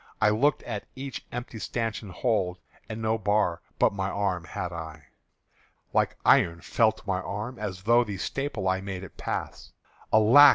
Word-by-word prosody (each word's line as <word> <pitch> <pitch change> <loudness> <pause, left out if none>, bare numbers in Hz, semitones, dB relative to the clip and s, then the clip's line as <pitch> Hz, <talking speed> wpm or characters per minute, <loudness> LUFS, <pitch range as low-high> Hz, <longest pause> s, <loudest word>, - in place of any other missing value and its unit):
I 105 - +5
looked 135 +7 +2
at 110 -4 -5
each 135 -1 -6
empty 120 -2 -5
stanchion 115 -2 -3
hold, 95 -3 0 0.3
And 110 +1 -5
no 110 0 +1
bar 105 -4 +1 0.2
but - - +4
my 95 -1 -1
arm 95 -5 -1
had 90 +1 -4
I! 80 -4 -8 0.8
Like - - +2
iron 85 0 +5
felt 110 -2 +2
my 95 -2 0
arm, 105 +7 -5
as 95 -4 -4
through 120 +4 +4
The 100 -3 -4
staple 135 -1 -2
I 95 0 +1
made 95 -1 -5
it 95 - -10
pass: - - -4 0.4
Alack! 115 +7 +9
105 Hz, 165 wpm, -27 LUFS, 95-115 Hz, 0.8 s, Alack